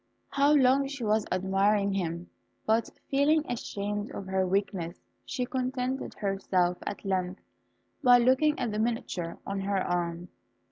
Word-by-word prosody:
How 280 +1 +3
long 275 -1 +4
she 275 -3 -6
was 215 0 +1
admiring 195 +2 +2
him! 170 -2 -3 0.3
but 225 +1 +2 0.2
feeling 295 +3 +3
ashamed 205 -3 -3
of 195 - -6
her 190 0 0
weakness, 185 -2 -1 0.3
she 255 -3 -2
contented 255 0 -2
herself 190 -3 0
at 200 - -5
length 185 -1 -1 0.6
by 245 -2 +8
looking 260 +5 +3
at 245 -4 -1
the 210 - -2
miniature 220 -7 -2
on 195 0 -3
her 195 0 -1
arm. 175 -1 -2
205 Hz, 140 wpm, -29 LUFS, 190-255 Hz, 0.6 s, by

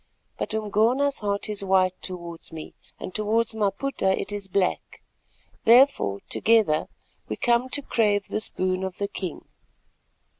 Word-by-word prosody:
But - - -2
Umgona's 225 +7 +1
heart 200 -1 -1
is 210 -2 -2
white 185 -1 +3
towards 170 -3 -7
me, 160 -1 -8 0.3
and 185 - -7
towards 220 +1 0
Maputa 205 -1 0
it 195 - -4
is 205 -1 -4
black, 190 -1 -1 0.6
therefore 235 - +4
together 215 -9 +2 0.4
we - - -2
come 240 +1 +1
to 285 +2 0
crave 205 -5 +1
this 215 - +2
boon 185 0 -1
of 190 -1 -4
the 200 - -2
king." 185 -4 -6
205 Hz, 140 wpm, -25 LUFS, 185-230 Hz, 0.6 s, therefore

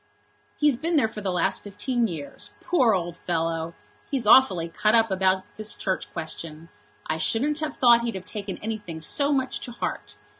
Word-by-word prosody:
"He's 295 -3 +4
been 330 +5 -1
there 275 -7 +4
for 215 -1 -8
the 195 -2 -1
last 180 +2 +1
fifteen 235 +4 -1
years. 155 -7 -5
Poor 255 - +3
old 175 -1 -3
fellow! 165 -1 -2 0.3
He's 265 -5 0
awfully 200 -8 +6
cut 215 +6 +2
up 225 -2 +4
about 190 0 +2
this 215 0 -5
Church 190 -1 -3
Question. 165 -1 -7 0.4
I 155 - -1
shouldn't 285 - +1
have 310 -2 -4
thought 240 -2 +6
he'd 235 -2 -3
have 185 -1 -6
taken 205 -2 -5
anything 205 -7 -5
so 285 - 0
much 265 -2 0
to 245 - -6
heart. - - -5
210 Hz, 180 wpm, -25 LUFS, 170-245 Hz, 0.4 s, awfully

